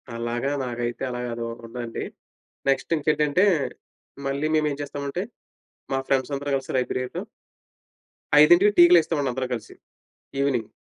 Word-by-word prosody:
అలాగా 120 +3 -2 0.2
నాకైతే 120 0 -3
అలాగ 125 0 -4
అదోకటుందండి. 115 0 -6 0.7
నెక్స్టింకేంటంటే, 150 +4 +2 0.8
మళ్ళీ 140 +3 -1
మేమేం 150 -2 +1
చేస్తామంటే, 145 +4 -4 0.7
మా 135 - +1
ఫ్రెండ్సందరూ 140 +1 0
కలిసి 135 -1 -3
లైబ్రేరిలో 125 0 -2 1.2
5కి 175 +7 +7
టీకి 175 0 +8
లేస్తామండి 150 -5 +1
అందరం 130 0 -3
కలిసి. 115 -2 -6 0.7
ఈవినింగ్. 125 -6 0
135 Hz, 100 wpm, -24 LUFS, 120-150 Hz, 1.2 s, టీకి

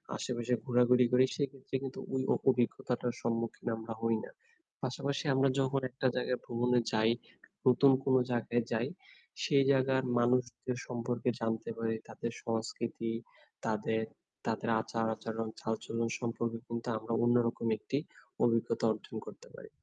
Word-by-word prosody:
আশেপাশে 120 0 -2
ঘোরাঘুরি 125 0 +5
করি 125 +1 +6
সেক্ষেত্রে 135 -2 -3
কিন্তু 135 -1 -5
ঐ - - +1 0.2
অ - - +3
অভিজ্ঞতাটার 125 -1 +1
সম্মুখীন 115 +1 -2
আমরা 115 0 -5
হই 115 0 +2
না। - - -12 0.5
পাশাপাশি 140 +3 -1
আমরা 135 +1 +4
যখন 135 0 +2
একটা 130 +1 0
জায়গায় 125 0 0
ভ্রমণে 120 +1 +2
যাই, 110 +1 +4 0.5
নতুন 130 +2 +7
কোন 130 - +3 0.2
জায়গায় 120 0 +1
যাই। 115 +2 +1 0.6
সেই 140 -2 +4
জায়গার 130 -1 +3 0.2
মানুষদের 125 0 +1
সম্পর্কে 120 0 -1
জানতে 115 -1 -1
পারি। 115 0 0
তাদের 115 - -4
সংস্কৃতি, 115 0 -2 0.6
তাদের 110 0 0 0.4
তাদের - - -1
আচার-আচরণ, 115 0 -2
চালচলন 115 +1 -2
সম্পর্কে 115 -1 -2
কিন্তু 115 +1 -4
আমরা 110 +1 -4
অন্যরকম 120 -1 +2
একটি 135 - -2 0.5
অভিজ্ঞতা 115 0 +2
অর্জন - - -8
করতে - - -11
পারি। 485 -3 -11
120 Hz, 135 wpm, -33 LUFS, 115-130 Hz, 0.6 s, নতুন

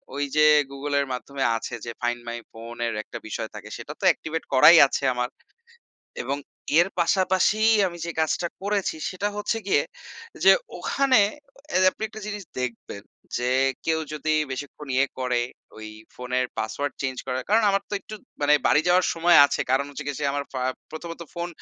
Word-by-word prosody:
ওই 145 - -1
যে, 155 - +5 0.3
Google 140 +1 -3
এর 140 - +1
মাধ্যমে 135 +2 -4
আছে 115 - -7
যে, - - -5
ফাইন্ড 120 0 -1
মাই 120 0 -4 0.2
ফোন 115 +1 -9
এর 115 - -1
একটা - - -8
বিষয় - - -4
থাকে, - - -9
সেটা - - -8
তো - - -11
অ্যাক্টিভেট 160 +1 -2
করাই 150 +6 +8
আছে 140 - -2
আমার। 125 0 -1 0.9
এবং 135 +3 -2 0.4
এর 175 - +5
পাশাপাশি 190 +4 +2 0.3
আমি 175 -1 -8
যে, - - -4
কাজটা 160 +2 0
করেছি 200 -2 -1
সেটা 195 +2 -2
হচ্ছে 210 +2 -1
গিয়ে, 200 - +3 0.6
যে, - - +8 0.3
ওখানে, 275 -2 +2 0.7
আপনি 215 - -8
একটা 215 0 -10
জিনিস 210 -1 -5 0.2
দেখবেন 115 -5 -5 0.4
যে, 125 +1 -1 0.4
কেউ 160 0 +1
যদি 155 +1 -2 0.2
বেশিক্ষণ 145 +2 -7
ইয়ে 135 +1 +3
করে? 125 -2 0 0.4
ওই 110 0 -8 0.3
ফোনের 125 0 -1
পাসওয়ার্ড 125 +6 -2
চেঞ্জ 130 -1 -2
করার; 130 0 -2
কারণ 220 +2 +4
আমার 195 0 +2
তো - - -5
একটু 215 - -9 0.3
মানে 145 +1 +4
বাড়ি 150 - +4
যাওয়ার 180 +1 +4
সময় 170 +1 +5
আছে। - - -3
কারণ 135 +1 +2
হচ্ছে 145 +1 -7
যে, - - -17
গিয়ে, 145 -1 -3
সে 145 - -1
আমার 145 0 -1
ফ - - -7 0.4
প্রথমত 165 +2 -7
ফোন 170 0 -3
145 Hz, 180 wpm, -25 LUFS, 125-175 Hz, 0.9 s, করাই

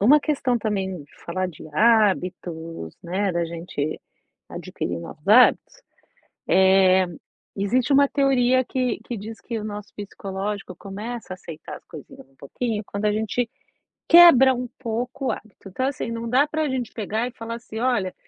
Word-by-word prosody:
uma 265 +9 +6
questão 275 -5 0
também 190 -7 -3 0.2
falar 185 +2 -1
de 160 -3 -10
hábitos, 180 - +1
né, 190 +3 -1
da 170 -1 0
gente 165 -3 -4 0.5
adquirir 85 -1 -5
novos 150 - -10
hábitos, 245 +4 +5 0.7
eh, 190 -1 +5 0.5
existe 245 +7 +1
uma 280 +1 +6
teoria 260 -2 +3
que 250 -2 -2
que 240 - -5
diz 220 +2 -8
que 230 -1 -4
o 210 - -6
nosso 210 -1 -6
psicológico 195 -1 -5
começa 210 +4 -7
a 185 - -6
aceitar 165 -3 -9
as - - -33
coisinhas - - -12
um 135 - -30
pouquinho 215 - -3
quando 200 +1 -3
a 210 - +3
gente 220 +2 -1 0.6
quebra 275 -7 +8
um 250 0 -4
pouco 250 +3 -4
o - - +2
hábito, 210 -2 -10
então 255 +8 -2
assim, 255 -4 -4
não 230 0 -4
dá 260 +5 +4
para 310 0 -1
gente 255 -3 -3
pegar 220 +2 -2
e 250 - -6
falar 230 -1 -6
assim: 225 -1 -8
"Olha, 240 -8 0
215 Hz, 160 wpm, -23 LUFS, 190-250 Hz, 0.7 s, quebra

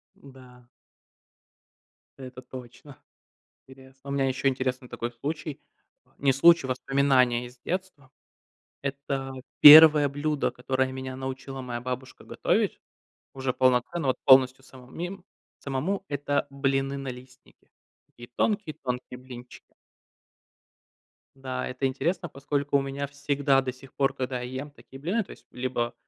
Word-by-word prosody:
Да. 125 -3 -16 1.5
Это 130 -1 -9
точно. 130 +2 -12 0.7
Интересно. 130 +1 -15
У - - -2
меня 135 -1 +1
еще 135 +1 -1
интересный 130 -1 -2
такой 120 +1 -4
случай. 150 +4 -5 0.6
Не 135 -1 +2
случай, 170 +1 +5
воспоминания 130 -2 +2
из 125 0 -14
детства. 175 -7 -5 0.7
Это 135 -1 -4 0.3
1 150 -1 +10
блюдо, 145 +1 -1
которое 130 +1 -1
меня 130 0 -6
научила 130 0 -6
моя 120 -1 -5
бабушка 130 +1 -6
готовить - - 0 0.5
уже 130 -1 -2
полноценно, 130 +5 +1
вот 130 - +2
полностью 130 0 +5
самому 130 -1 -16
мем 180 +2 -6 0.3
самому. 160 +9 -3
Это 145 0 -1
блины-налистники. 135 -2 -4 0.4
Такие 120 0 -14
тонкие-тонкие 135 - -2
блинчики. 125 -1 -13 1.6
Да, 130 -1 -4
это 130 +2 -3
интересно, 170 +5 -2
поскольку 140 +1 -1
у 140 - 0
меня 140 +1 -4
всегда 140 -1 +1
до 130 - -3
сих 130 +1 -16
пор, 135 -1 +1
когда 125 -1 -3
я 130 +2 -5
ем 145 - -12
такие 135 -1 -15
блины- 195 +9 -1
то - - -14
есть - - -14
либо 120 -1 -2
135 Hz, 125 wpm, -26 LUFS, 130-140 Hz, 1.6 s, 1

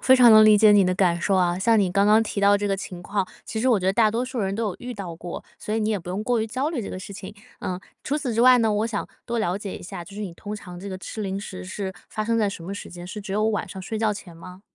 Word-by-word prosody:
非 260 - +6
常 245 -2 +7
能 215 0 +9
理 215 -1 +7
解 215 0 +6
你 205 -2 +6
的 185 - +1
感 175 -2 +2
受 195 +2 +1
啊。 180 -1 +2
像 225 +3 +3
你 190 -3 +2
刚 200 +2 +3
刚 215 +1 +6
提 210 -2 -3
到 200 0 +5
这 205 0 -2
个 195 - +1
情 180 -2 -7
况， 195 0 -1 0.2
其 220 - -4
实 255 - 0
我 225 -5 +4
觉 - - -5
得 190 - +3
大 220 +1 +4
多 230 +4 -1
数 255 -1 -5
人 195 -1 -1
都 230 - -2
有 180 - -5
遇 245 0 -6
到 185 -5 -6
过， 175 0 -7
所 215 - -4
以 225 - 0
你 215 +1 0
也 205 - 0
不 175 - -11
用 190 +4 -2
过 235 0 +1
于 220 - -1
焦 255 +6 -1
虑 280 -8 -2
这 200 - -6
个 - - -6
事 190 +2 -8
情。 195 +1 -9 0.2
嗯， 185 0 -4 0.2
除 290 - 0
此 270 -6 -2
之 230 - +1
外 255 0 +7
呢， 225 -2 +2
我 210 +2 +1
想 220 -3 -3 0.2
多 235 -1 -1
了 180 -1 0
解 200 -2 -6
一 - - -11
下， 175 -1 -7
就 200 - -13
是 210 - -6
你 190 -5 -4
通 205 +4 -7
常 180 -4 -9
这 200 +2 -7
个 190 - -5
吃 190 +4 -7
零 195 -1 -2
食 90 - -7
是 190 - -4 0.2
发 215 -1 -3
生 230 +1 +1
在 210 -2 +2
什 185 -4 -7
么 185 - -6
时 200 - -7
间？ 175 0 -9
是 205 +4 -7
只 195 -1 -6
有 210 +1 +1
晚 215 -2 -1
上 190 -2 -8
睡 220 +3 -4
觉 215 -1 +1
前 175 -4 -10
吗？ 180 +3 -11
205 Hz, 360 characters per minute, -24 LUFS, 185-220 Hz, 0.2 s, 能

